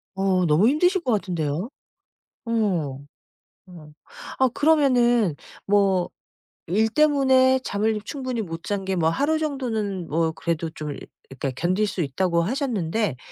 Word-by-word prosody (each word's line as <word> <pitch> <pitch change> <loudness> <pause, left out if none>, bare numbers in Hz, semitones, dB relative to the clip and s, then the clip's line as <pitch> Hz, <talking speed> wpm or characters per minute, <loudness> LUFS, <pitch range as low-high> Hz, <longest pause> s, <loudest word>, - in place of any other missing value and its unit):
어 190 -2 +1
너무 165 +8 +4
힘드실 355 +7 +2
것 250 - 0
같은데요. 175 - -2 0.8
어. 185 -12 -1 0.7
어. 160 -4 -13 0.5
아 260 -1 +4
그러면은 245 - +3 0.3
뭐 195 -3 +2 0.6
일 215 +6 +2
때문에 265 -2 +4
잠을 210 +1 0
충분히 255 -3 -4
못 165 -4 -7
잔 195 +1 -3
게 190 0 -1
뭐 165 -2 +2
하루 290 - +1
정도는 225 - -3
뭐 160 +1 0
그래도 165 0 -3
좀 150 -2 -6 0.3
그니까 135 0 -4
견딜 185 +5 +1
수 195 - -5
있다고 170 +4 0
하셨는데 215 - -1
200 Hz, 250 characters per minute, -23 LUFS, 170-255 Hz, 0.8 s, 너무